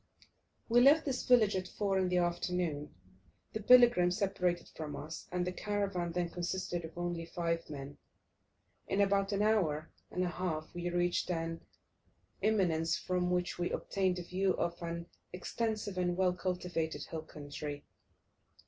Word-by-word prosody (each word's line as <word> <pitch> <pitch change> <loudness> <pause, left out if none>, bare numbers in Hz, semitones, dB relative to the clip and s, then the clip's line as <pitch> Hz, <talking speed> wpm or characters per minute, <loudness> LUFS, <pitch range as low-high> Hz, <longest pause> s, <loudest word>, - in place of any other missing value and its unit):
We 240 +1 +5
left 295 +5 +6
this 265 -3 -2
village 225 -5 +5
at 185 -1 -2
4 195 0 0
in 185 -1 +1
the 180 - +2
afternoon. 175 -3 -1 0.6
The 220 - -3
pilgrim 240 -6 +7
separated 180 -2 0
from 155 -2 -6
us, 160 +2 -7
and 180 0 0
the 180 - -1
caravan 195 -3 -1
then 175 0 -1
consisted 175 0 -2
of 160 +1 -9
only 175 -1 -2
five 165 -1 -2
men. 140 -1 -7 0.9
In 195 - 0
about 200 0 +3
an 200 0 +1
hour 170 -8 +1 0.2
and 180 - -1
a - - +1
half 165 -3 -3
we 175 0 -3
reached 175 0 +1
an 165 -1 -2 0.8
eminence 175 -7 +2
from 180 -1 0
which 180 0 0
we 175 - 0
obtained 190 -2 0
a 180 - -4
view 185 +2 +1
of 170 0 -2
an 170 0 -4 0.3
extensive 210 +1 -2
and 175 -1 0
well 185 -1 +3
cultivated 180 -3 -2
hill 160 - -5
country. 145 -1 -7
180 Hz, 155 wpm, -33 LUFS, 170-195 Hz, 0.9 s, pilgrim